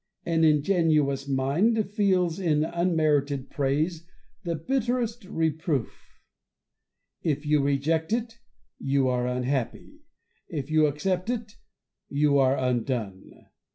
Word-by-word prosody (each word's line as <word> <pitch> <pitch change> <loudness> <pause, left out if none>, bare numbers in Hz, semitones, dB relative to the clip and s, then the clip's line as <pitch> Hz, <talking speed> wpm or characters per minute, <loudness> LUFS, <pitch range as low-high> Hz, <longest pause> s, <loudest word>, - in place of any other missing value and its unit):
An 165 -1 +1
ingenuous 150 -3 +2
mind 175 - +1
feels 185 -5 +1
in 155 -5 +2
unmerited 155 -5 0
praise 150 +4 -1 0.4
the 170 -2 -2
bitterest 240 - -1
reproof. 160 - -3 1.0
If 150 -2 -1
you 150 -1 +3
reject 150 +4 0
it, 230 0 -2 0.4
you 135 -1 +1
are 125 -1 0
unhappy; 125 0 -3 0.5
if 145 -1 -5
you 155 -1 +4
accept 180 +7 -2
it, 230 -3 -3 0.6
you 145 0 +2
are 135 0 +3
undone. 120 -6 -3
155 Hz, 105 wpm, -26 LUFS, 140-180 Hz, 1.0 s, you